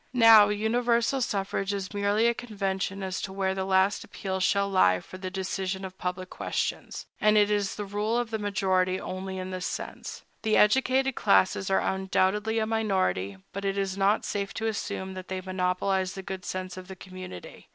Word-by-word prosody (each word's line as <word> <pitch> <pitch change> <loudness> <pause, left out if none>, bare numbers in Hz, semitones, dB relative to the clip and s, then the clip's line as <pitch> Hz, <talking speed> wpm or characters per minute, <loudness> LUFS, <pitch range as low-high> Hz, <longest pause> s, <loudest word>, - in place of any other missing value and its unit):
Now, 225 -3 +8
universal 235 +4 +1
suffrage 195 -2 -1
is 200 0 -4
merely 205 +2 +2
a 235 - +4
convention 195 -4 -3
as 185 -1 -3
to 190 - -4
where 190 0 0
the 190 0 -2
last 190 +1 +2
appeal 190 -2 -4
shall 200 +1 +2
lie 95 - +4
for 185 - -11
the 185 0 -4
decision 190 0 -3
of 190 0 -10
public 185 0 -4
questions; - - -3
and 215 0 +4
it 210 0 +4
is 205 -2 0
the 205 - -4
rule 210 +3 -1
of 240 -1 -2
the 220 - -1
majority 190 -2 +1
only 190 0 -5
in 185 0 -5
this 185 -1 -3
sense. - - -6 0.2
The 215 -1 +2
educated 265 +4 +3
classes 195 -3 +2
are 190 - +3
undoubtedly 190 +3 +1
a 220 - +2
minority; 190 - 0 0.2
but 200 - -5
it 195 0 -1
is 195 -1 -1
not 200 +2 +2
safe 200 0 -3
to 220 - -3
assume 190 -3 -3
that 185 -1 -8
they 190 0 -3
monopolize 185 +1 -1
the 195 - -7
good 190 -1 -6
sense 185 0 -4
of 185 -1 -9
the 190 - -8
community. 185 - -10
195 Hz, 190 wpm, -27 LUFS, 185-210 Hz, 0.2 s, Now